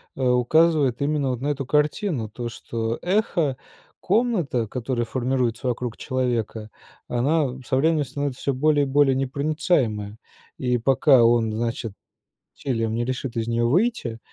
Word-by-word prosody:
э, -, -, -6 dB
указывает 135 Hz, +1 st, +3 dB
именно 145 Hz, -1 st, 0 dB
вот 125 Hz, -1 st, -3 dB
на 140 Hz, -, -2 dB
эту 140 Hz, -2 st, -2 dB
картину. 150 Hz, -, 0 dB
То, 120 Hz, +2 st, -5 dB
что 115 Hz, 0 st, -4 dB
эхо-комната, 175 Hz, -, -1 dB
которая 120 Hz, +1 st, -2 dB
формируется 125 Hz, 0 st, -1 dB
вокруг 120 Hz, -1 st, -2 dB
человека, 120 Hz, -4 st, -2 dB, 0.4 s
она 130 Hz, +1 st, 0 dB
со 130 Hz, -, 0 dB
временем 155 Hz, +2 st, +2 dB
становится 135 Hz, 0 st, -4 dB
всё 140 Hz, -, 0 dB
более 145 Hz, +2 st, +2 dB
и -, -, -5 dB
более 135 Hz, -1 st, +4 dB
непроницаемая. 135 Hz, -, -1 dB, 0.4 s
И 125 Hz, -1 st, 0 dB
пока 135 Hz, +1 st, +4 dB
он, 115 Hz, -1 st, +3 dB
значит, 115 Hz, -1 st, -3 dB, 0.6 s
усилием 115 Hz, -4 st, -2 dB
не 120 Hz, -, 0 dB
решит 130 Hz, 0 st, -4 dB
из 115 Hz, 0 st, -2 dB
нее 115 Hz, 0 st, +1 dB
выйти, 150 Hz, -, 0 dB
130 Hz, 140 wpm, -23 LUFS, 115-145 Hz, 0.6 s, более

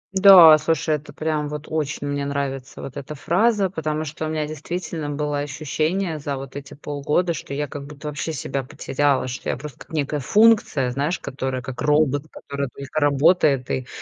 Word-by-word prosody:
Да, 185 Hz, -5 st, +10 dB
слушай, 160 Hz, 0 st, 0 dB
это 145 Hz, 0 st, -8 dB
прям 150 Hz, 0 st, -2 dB
вот 150 Hz, 0 st, -6 dB
очень 150 Hz, -2 st, -2 dB
мне 145 Hz, 0 st, -2 dB
нравится, 135 Hz, -2 st, -4 dB
вот 135 Hz, -, -8 dB
эта 145 Hz, +2 st, -6 dB
фраза, 195 Hz, +5 st, +2 dB
потому 155 Hz, -2 st, -2 dB
что 155 Hz, +1 st, -5 dB
у -, -, -3 dB
меня 155 Hz, -1 st, -1 dB
действительно 155 Hz, 0 st, -5 dB
было 145 Hz, 0 st, -2 dB
ощущение 155 Hz, +4 st, -2 dB
за 140 Hz, -1 st, -3 dB
вот 135 Hz, 0 st, -9 dB
эти 140 Hz, 0 st, -8 dB
полгода, 150 Hz, +4 st, -1 dB
что 140 Hz, -2 st, -6 dB
я 145 Hz, +1 st, -2 dB
как 140 Hz, 0 st, -8 dB
будто 150 Hz, +1 st, -7 dB
вообще 150 Hz, +2 st, -4 dB
себя 140 Hz, -2 st, -3 dB
потеряла, 135 Hz, +1 st, 0 dB
что 130 Hz, +1 st, -5 dB
я -, -, -1 dB
просто 140 Hz, 0 st, -9 dB
как -, -, -13 dB
некая 150 Hz, -1 st, -1 dB
функция, 200 Hz, -, +3 dB
знаешь, 145 Hz, +7 st, -1 dB
которая 130 Hz, -1 st, -4 dB
как 125 Hz, +1 st, -6 dB
робот, 150 Hz, -1 st, +2 dB
который 140 Hz, 0 st, -5 dB
только 140 Hz, +4 st, -5 dB
работает 145 Hz, -2 st, +3 dB
и, 130 Hz, -1 st, -2 dB
145 Hz, 185 wpm, -22 LUFS, 140-155 Hz, -, Да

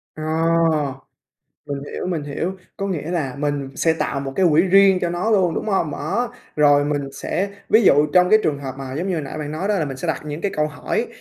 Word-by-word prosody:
Ờ, 155 Hz, -, -6 dB, 1.4 s
mình 140 Hz, -1 st, -4 dB
hiểu, -, -, -4 dB
mình 170 Hz, -5 st, -2 dB
hiểu. 145 Hz, +5 st, -3 dB, 0.2 s
Có 195 Hz, -, -3 dB
nghĩa 165 Hz, -3 st, -3 dB
là 145 Hz, -8 st, -2 dB
mình 145 Hz, -2 st, -2 dB
sẽ 165 Hz, -, +2 dB
tạo 145 Hz, -3 st, -2 dB
một 135 Hz, -1 st, -5 dB
cái 190 Hz, -, +4 dB
quỹ 155 Hz, +2 st, +5 dB
riêng 195 Hz, 0 st, +5 dB
cho 175 Hz, -, -1 dB
nó 175 Hz, +6 st, -1 dB
luôn, 185 Hz, -6 st, +3 dB
đúng -, -, -3 dB
hông? 190 Hz, -6 st, +1 dB
Đó, 200 Hz, +13 st, -2 dB, 0.2 s
rồi 145 Hz, -1 st, +5 dB
mình 145 Hz, -2 st, -2 dB
sẽ 195 Hz, +7 st, -2 dB, 0.2 s
ví 220 Hz, -, +5 dB
dụ 150 Hz, -6 st, +5 dB
trong 180 Hz, 0 st, +5 dB
cái 215 Hz, -, +7 dB
trường 145 Hz, -2 st, 0 dB
hợp 135 Hz, -2 st, -6 dB
mà 135 Hz, -1 st, -6 dB
giống 175 Hz, +5 st, -2 dB
như 185 Hz, -, 0 dB
hồi 160 Hz, -, -2 dB
nãy 140 Hz, -, -6 dB
bạn 150 Hz, -1 st, -4 dB
nói 175 Hz, +6 st, -3 dB
đó, 210 Hz, -, +2 dB
là 160 Hz, -, 0 dB
mình 135 Hz, -2 st, -5 dB
sẽ 155 Hz, -, -5 dB
đặt 155 Hz, -, -1 dB
những 150 Hz, +1 st, -5 dB
cái 200 Hz, -, -1 dB
câu 150 Hz, 0 st, +1 dB
hỏi 150 Hz, -2 st, -2 dB
155 Hz, 245 wpm, -21 LUFS, 145-185 Hz, 1.4 s, cái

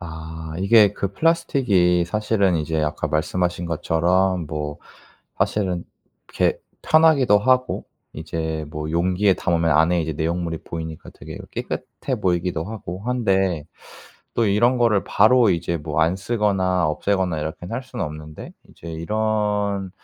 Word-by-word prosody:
아 80 Hz, -1 st, -8 dB
이게 100 Hz, +1 st, +5 dB
그 100 Hz, -1 st, -3 dB
플라스틱이 100 Hz, -, +2 dB
사실은 100 Hz, -1 st, +1 dB
이제 80 Hz, 0 st, -1 dB
아까 75 Hz, 0 st, -2 dB
말씀하신 85 Hz, +3 st, -1 dB
것처럼 85 Hz, +2 st, +1 dB
뭐 75 Hz, -1 st, -4 dB, 0.6 s
사실은 90 Hz, -5 st, 0 dB, 0.4 s
이렇게 -, -, 0 dB, 0.2 s
편하기도 150 Hz, -9 st, +5 dB
하고 130 Hz, +2 st, +1 dB, 0.3 s
이제 80 Hz, 0 st, -4 dB
뭐 75 Hz, 0 st, -5 dB
용기에 90 Hz, +4 st, +2 dB
담으면 85 Hz, -2 st, 0 dB
안의 85 Hz, +2 st, +3 dB
이제 80 Hz, -, -3 dB
내용물이 80 Hz, +1 st, -2 dB
보이니까 80 Hz, -1 st, -7 dB
되게 -, -, -10 dB
그 -, -, -9 dB
깨끗해 -, -, -4 dB
보이기도 90 Hz, -2 st, 0 dB
하고 95 Hz, -3 st, -7 dB
한데 95 Hz, -10 st, +1 dB, 0.7 s
또 115 Hz, -, +2 dB
이런 120 Hz, +5 st, +3 dB
거를 115 Hz, -5 st, +2 dB
바로 115 Hz, +1 st, +4 dB
이제 85 Hz, 0 st, -1 dB
뭐 75 Hz, 0 st, -2 dB
안 85 Hz, +4 st, +2 dB
쓰거나 95 Hz, -4 st, +1 dB
없애거나 90 Hz, +2 st, 0 dB
이렇게는 90 Hz, +6 st, -5 dB
할 125 Hz, -, -3 dB
수는 125 Hz, -3 st, -5 dB
없는데 75 Hz, 0 st, -8 dB, 0.2 s
이제 85 Hz, -, -12 dB
이런 105 Hz, +2 st, -1 dB
90 Hz, 310 characters per minute, -22 LUFS, 80-105 Hz, 0.7 s, 이게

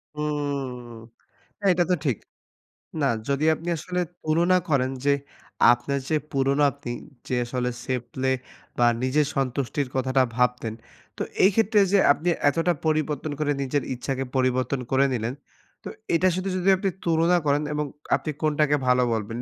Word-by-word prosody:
হুম! 140 Hz, -5 st, -3 dB, 0.7 s
এইটা 180 Hz, -1 st, +4 dB
তো -, -, +5 dB
ঠিক। 130 Hz, -7 st, +1 dB, 0.8 s
না, 140 Hz, -, +2 dB, 0.2 s
যদি 140 Hz, +2 st, +1 dB
আপনি 165 Hz, +2 st, -8 dB
আসলে 180 Hz, +3 st, -3 dB, 0.2 s
তুলনা 170 Hz, +4 st, +3 dB
করেন 135 Hz, -4 st, +2 dB
যে, 145 Hz, -, +4 dB, 0.6 s
আপনার 140 Hz, +3 st, -1 dB
যে 155 Hz, -, +2 dB, 0.2 s
পুরোনো 140 Hz, +1 st, +2 dB
আপনি 140 Hz, -3 st, -8 dB, 0.4 s
যে -, -, -2 dB
আসলে 125 Hz, +1 st, -2 dB, 0.2 s
safe 125 Hz, -2 st, -2 dB
play 130 Hz, 0 st, +1 dB, 0.4 s
বা, 120 Hz, -, +4 dB, 0.2 s
নিজের 140 Hz, +3 st, +2 dB
সন্তুষ্টির 135 Hz, +1 st, -1 dB
কথাটা 130 Hz, 0 st, +2 dB
ভাবতেন, 125 Hz, -3 st, 0 dB, 0.4 s
তো -, -, -2 dB, 0.2 s
এইক্ষেত্রে 210 Hz, +2 st, +4 dB
যে 200 Hz, -, +6 dB
আপনি 160 Hz, +4 st, -3 dB, 0.2 s
এতটা 165 Hz, +4 st, +2 dB
পরিবর্তন 155 Hz, -1 st, 0 dB
করে 150 Hz, -1 st, +1 dB
নিজের 140 Hz, +1 st, 0 dB
ইচ্ছাকে 135 Hz, +2 st, -3 dB
পরিবর্তন 130 Hz, +1 st, +1 dB
করে 135 Hz, +1 st, +4 dB
নিলেন, 120 Hz, 0 st, -2 dB, 0.5 s
তো -, -, -7 dB, 0.3 s
এটা 180 Hz, +3 st, +4 dB
শুধু 185 Hz, +2 st, -2 dB
যদি 185 Hz, +1 st, 0 dB
আপনি 195 Hz, +1 st, -1 dB, 0.2 s
তুলনা 170 Hz, +1 st, +3 dB
করেন 145 Hz, +1 st, +2 dB
এবং 150 Hz, 0 st, -1 dB, 0.3 s
আপনি 155 Hz, -, -4 dB
কোনটাকে 150 Hz, -1 st, +2 dB
ভালো 125 Hz, 0 st, +4 dB
বলবেন? 110 Hz, 0 st, -3 dB
140 Hz, 150 wpm, -25 LUFS, 130-155 Hz, 0.8 s, যে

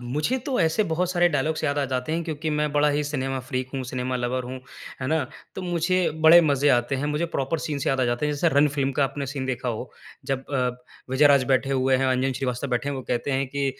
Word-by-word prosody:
मुझे 150 Hz, -, -1 dB
तो 270 Hz, -3 st, 0 dB
ऐसे 165 Hz, +5 st, +2 dB
बहुत 180 Hz, +2 st, 0 dB
सारे 175 Hz, -1 st, +3 dB
डायलॉग्स 155 Hz, +1 st, -1 dB
याद 145 Hz, 0 st, 0 dB
आ 140 Hz, -, +1 dB
जाते 125 Hz, +4 st, -2 dB
हैं 170 Hz, -, -1 dB
क्योंकि 155 Hz, -1 st, -3 dB
मैं 150 Hz, 0 st, 0 dB
बड़ा 145 Hz, 0 st, +3 dB
ही 145 Hz, +1 st, 0 dB
सिनेमा 135 Hz, -2 st, -2 dB
फ्रीक 130 Hz, -1 st, -2 dB
हूँ, 135 Hz, -, -2 dB
सिनेमा 125 Hz, 0 st, -3 dB
लवर 125 Hz, +1 st, -2 dB
हूँ, 130 Hz, +1 st, -7 dB, 0.4 s
है 130 Hz, -, -2 dB
ना? 160 Hz, -2 st, +1 dB, 0.3 s
तो 190 Hz, -, -5 dB
मुझे 175 Hz, +1 st, +1 dB, 0.2 s
बड़े 170 Hz, +2 st, +10 dB
मजे 140 Hz, +1 st, +2 dB
आते 120 Hz, 0 st, +2 dB
हैं, 145 Hz, +3 st, -2 dB
मुझे 155 Hz, +3 st, 0 dB
प्रॉपर 135 Hz, +4 st, -1 dB
सीन्स 145 Hz, -3 st, -3 dB
से -, -, 0 dB
याद 135 Hz, -1 st, 0 dB
आ -, -, +3 dB
जाते 120 Hz, +4 st, 0 dB
हैं। 150 Hz, -, 0 dB
जैसे 150 Hz, +4 st, +2 dB
रन 145 Hz, +1 st, +5 dB
फिल्म 135 Hz, -1 st, 0 dB
का 140 Hz, -, +5 dB
आपने 140 Hz, +1 st, -4 dB
सीन 135 Hz, 0 st, -4 dB
देखा 125 Hz, -1 st, -2 dB
हो 115 Hz, -2 st, -4 dB, 0.3 s
जब 135 Hz, -1 st, -2 dB
अ, 130 Hz, -3 st, +1 dB, 0.4 s
विजय 135 Hz, +3 st, +5 dB
राज 140 Hz, -2 st, +5 dB
बैठे 135 Hz, +1 st, +1 dB
हुए 130 Hz, 0 st, +2 dB
हैं, 135 Hz, +1 st, +1 dB
अंजन 130 Hz, +1 st, +1 dB
श्रीवास्तव 125 Hz, +1 st, -2 dB
बैठे 125 Hz, +2 st, -1 dB
हैं 140 Hz, -, -2 dB
वो 130 Hz, -, -5 dB
कहते 120 Hz, +3 st, -1 dB
हैं 135 Hz, 0 st, 0 dB
कि 140 Hz, 0 st, -1 dB
140 Hz, 255 wpm, -24 LUFS, 130-150 Hz, 0.4 s, बड़े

